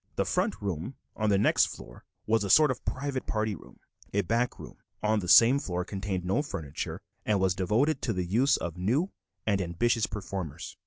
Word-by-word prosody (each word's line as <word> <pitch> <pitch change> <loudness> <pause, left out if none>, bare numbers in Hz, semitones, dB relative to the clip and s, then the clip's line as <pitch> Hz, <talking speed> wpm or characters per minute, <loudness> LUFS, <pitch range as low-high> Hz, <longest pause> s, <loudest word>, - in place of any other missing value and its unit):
The - - 0
front - - 0
room 95 - -3 0.2
on 110 -1 0
the 100 - +4
next 100 - +4
floor - - -11 0.2
was 110 -1 +2
a 100 - -3
sort 150 +7 +6
of 125 - -6
private 135 0 -3
party 110 -1 -1
room; - - -13 0.4
a 100 - +4
back 115 +6 0
room - - -11 0.3
on 105 0 +2
the 90 - -5
same 120 +9 +7
floor 90 -8 -3
contained 95 -2 -4
no 95 +10 +1
furniture 80 - -5 0.2
and 105 -2 +1
was 95 -1 +2
devoted 110 - +1
to 115 - -1
the 90 -2 -2
use 120 +10 +3
of 85 +1 -5
new 130 - +1 0.3
and 100 -3 +1
ambitious 105 +6 +1
performers. 95 -6 -6
105 Hz, 195 wpm, -28 LUFS, 90-120 Hz, 0.4 s, same